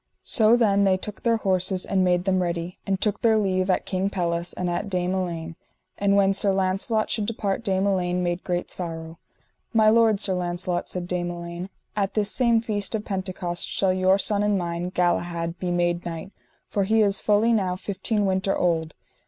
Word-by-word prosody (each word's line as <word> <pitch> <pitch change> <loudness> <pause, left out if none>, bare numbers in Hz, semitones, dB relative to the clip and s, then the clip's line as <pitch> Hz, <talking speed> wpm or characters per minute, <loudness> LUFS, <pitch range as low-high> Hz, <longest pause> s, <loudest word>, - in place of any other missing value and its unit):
So 225 0 +4
then 200 -4 +3
they 190 -1 +3
took 205 +2 -8
their 230 -1 +2
horses 185 -2 0
and 190 -1 +1
made 180 -1 +2
them 190 -1 +2
ready, 170 0 -3
and 195 -1 0
took 210 -1 0
their 225 -1 +4
leave 190 -2 0
at 185 - +1
King 190 +1 -1
Pelles 170 -2 -2
and 180 - -3
at 175 +4 -2
Dame 180 -1 -1
Elaine. 170 -3 -3 0.4
And 200 0 +2
when 195 -1 +4
Sir 195 0 +3
Launcelot 195 +3 0
should 210 -2 -1
depart 210 -2 -2
Dame 190 -2 +1
Elaine 180 -2 0
made 175 +1 -2
great 175 -1 -2
sorrow. 165 -2 -5 0.5
My 215 -1 +5
lord, 225 -2 +4
Sir 195 -2 +2
Launcelot, 175 0 -2
said 180 -1 -4
Dame 175 -1 -2
Elaine, 170 +1 -6 0.3
at 200 -2 -1
this 210 -1 +2
same 235 -3 +4
feast 210 -1 -3
of 215 - -4
Pentecost 185 -3 -3
shall 190 -2 +1
your 185 +1 +3
son 205 0 +1
and 205 -1 +2
mine, 170 0 -3
Galahad, 175 -1 -1
be 180 - -2
made 175 0 0
knight, 170 +2 -6 0.4
for 200 - 0
he 220 +2 +3
is 200 -1 +1
fully 215 +3 +3
now 190 -4 +1
fifteen 200 +2 -2
winter 190 0 0
old. 165 -3 0
185 Hz, 195 wpm, -24 LUFS, 175-205 Hz, 0.5 s, My